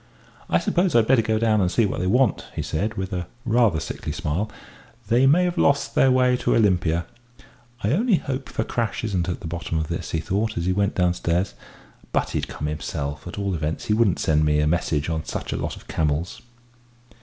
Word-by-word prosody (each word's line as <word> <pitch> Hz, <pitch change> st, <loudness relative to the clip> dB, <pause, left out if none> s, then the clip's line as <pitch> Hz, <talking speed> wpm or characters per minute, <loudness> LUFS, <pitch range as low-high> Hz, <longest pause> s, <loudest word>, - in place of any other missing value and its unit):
"I -, -, +4 dB
suppose 180 Hz, -3 st, +1 dB
I'd 115 Hz, -2 st, +5 dB
better 130 Hz, 0 st, +4 dB
go 110 Hz, 0 st, 0 dB
down 110 Hz, -2 st, +2 dB
and 90 Hz, -1 st, +1 dB
see 115 Hz, -, +3 dB
what 100 Hz, -, -2 dB
they 90 Hz, -, -1 dB
want," 125 Hz, +2 st, +2 dB
he -, -, -2 dB
said, 100 Hz, +8 st, -2 dB
with 95 Hz, +1 st, -4 dB, 0.3 s
rather 115 Hz, -6 st, +3 dB
a -, -, -1 dB
sickly -, -, -5 dB
smile. 90 Hz, +9 st, -2 dB, 0.6 s
"They 125 Hz, +3 st, +4 dB
may 165 Hz, +6 st, +5 dB
have 175 Hz, 0 st, -1 dB
lost 140 Hz, 0 st, +2 dB
the 135 Hz, -, +4 dB
way 125 Hz, -1 st, +3 dB
to -, -, +1 dB
Olympia.... 90 Hz, -6 st, +2 dB, 0.8 s
I 105 Hz, -, +1 dB
only 215 Hz, -, +3 dB
hope 135 Hz, -4 st, -4 dB
Fakrash 115 Hz, -2 st, -2 dB
isn't 95 Hz, -5 st, -1 dB
at 90 Hz, -, -4 dB
the -, -, -5 dB
bottom 85 Hz, 0 st, -3 dB
of 80 Hz, -1 st, -2 dB
this," -, -, -4 dB
he 80 Hz, -, -1 dB
thought, 105 Hz, +6 st, -1 dB
as 85 Hz, -, -1 dB
he 90 Hz, -, +2 dB
went 100 Hz, +1 st, 0 dB
downstairs. 90 Hz, -2 st, +1 dB, 0.6 s
"But -, -, 0 dB
he'd -, -, -2 dB
come 75 Hz, -, -6 dB
himself 75 Hz, 0 st, -4 dB
at 85 Hz, -, -7 dB
all 100 Hz, -1 st, -1 dB
events, 80 Hz, -1 st, -3 dB
he 105 Hz, -, +1 dB
wouldn't 105 Hz, -5 st, +3 dB
send 75 Hz, -1 st, +2 dB
me 75 Hz, -1 st, +2 dB
a 75 Hz, -, +2 dB
message 75 Hz, -2 st, 0 dB
on 80 Hz, -1 st, -2 dB
such -, -, -4 dB
a -, -, -2 dB
lot -, -, -3 dB
of -, -, -15 dB
camels!" 80 Hz, +2 st, -1 dB
95 Hz, 210 wpm, -23 LUFS, 80-115 Hz, 0.8 s, I'd